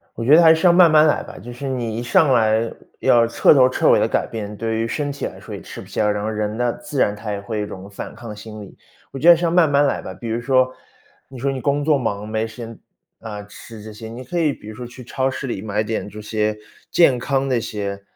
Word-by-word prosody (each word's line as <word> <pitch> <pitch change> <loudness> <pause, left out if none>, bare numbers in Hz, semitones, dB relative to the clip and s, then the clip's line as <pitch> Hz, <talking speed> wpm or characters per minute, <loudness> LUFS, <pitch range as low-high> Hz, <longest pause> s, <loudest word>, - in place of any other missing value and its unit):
我 115 - -4
觉 145 +5 +6
得 170 - +7
还 160 -1 +7
是 160 +3 +1
要 175 - +7
慢 175 -2 +6
慢 155 0 +6
来 150 - +2
吧， - - -11
就 120 +5 -9
是 135 +3 -6
你 120 -4 -3
一 - - -3
上 145 +3 +3
来 110 -1 +2 0.3
要 115 -1 +4
彻 115 - +4
头 130 -3 +6
彻 130 - +1
尾 - - +5
地 - - +2
改 - - 0
变， 105 -2 -6
对 115 +1 -2
于 115 +1 -1
身 145 +3 -2
体 140 - -4
来 - - -8
说 - - -9
也 - - -7
吃 - - -9
不 - - -12
消。 105 -1 0
然 105 0 -2
后 110 - -2
人 105 0 -2
呢， 120 0 0
自 140 - -3
然 105 - +2
他 105 +1 -7
也 100 - -4
会 110 +2 -5
有 - - -1
一 - - -8
种 95 +1 -9
反 100 - -8
抗 115 -3 -9
心 105 0 -10
理。 100 - -12 0.4
我 135 - -6
觉 155 +6 +3
得 170 - +9
是 175 - -3
要 170 - +2
慢 170 -3 +4
慢 145 0 +4
来 - - -1
吧， 95 - -7
比 115 +5 -8
如 115 +1 -2
说， 130 0 +2 0.6
你 130 - -11
说 135 +3 -1
你 130 - -4
工 145 +2 0
作 150 -2 +3
忙， 105 -5 -3
没 110 +1 -1
时 110 - -13
间 115 -1 -8 0.4
啊， 105 -2 -7
吃 110 +2 -12
这 110 +1 -9
些 110 +1 -9
你 120 +3 -8
可 175 +8 -4
以 155 -3 +2
比 105 - -12
如 110 - -8
说 120 +1 -7
去 125 +1 -12
超 130 +2 -1
市 135 +1 -5
里 100 -5 -4
买 105 0 -1
点 110 -1 -3
这 105 +1 -9
些 105 0 -1 0.3
健 165 -7 +4
康 135 +2 -1
的 130 - +1
一 - - -2
些， 100 -2 -5
115 Hz, 310 characters per minute, -21 LUFS, 105-135 Hz, 0.6 s, 得